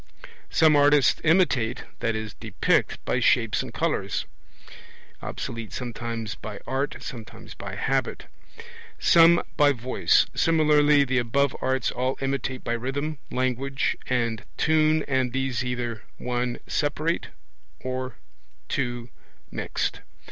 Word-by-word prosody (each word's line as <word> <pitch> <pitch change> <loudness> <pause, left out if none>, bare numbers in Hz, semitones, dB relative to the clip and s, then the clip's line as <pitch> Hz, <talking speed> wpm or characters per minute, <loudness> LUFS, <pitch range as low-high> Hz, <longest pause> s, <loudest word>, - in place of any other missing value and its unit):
Some 155 -1 +5
artists 145 -1 +4
imitate 155 -9 +2 0.2
(i.e. 110 -2 -2
depict) - - 0
by - - +1
shapes - - +3
and - - -7
colours. - - -1 1.0
(Obs. - - -4 0.2
sometimes 115 -2 -4
by 105 -1 -8
art, 135 +3 -1
sometimes 115 -3 -9
by - - -7
habit.) - - -1 0.7
Some 170 +1 +6
by 145 -2 +5
voice. 125 0 +2
Similarly 150 -3 +4
the 130 -1 +1
above 135 +3 +1
arts 130 -1 0
all 130 +2 -1
imitate 135 -1 -2
by 115 - -1
rhythm, 135 +5 -3
language, 130 +2 -1
and 115 -3 0
tune, 155 0 +3
and 130 -3 0
these 135 -1 -1
either 120 -3 -3 0.2
(1) 125 0 -2
separate 155 +3 -1 0.5
or 130 0 -4 0.5
(2) 120 -3 -2 0.4
mixed. - - -2
130 Hz, 110 wpm, -25 LUFS, 120-145 Hz, 1.0 s, Some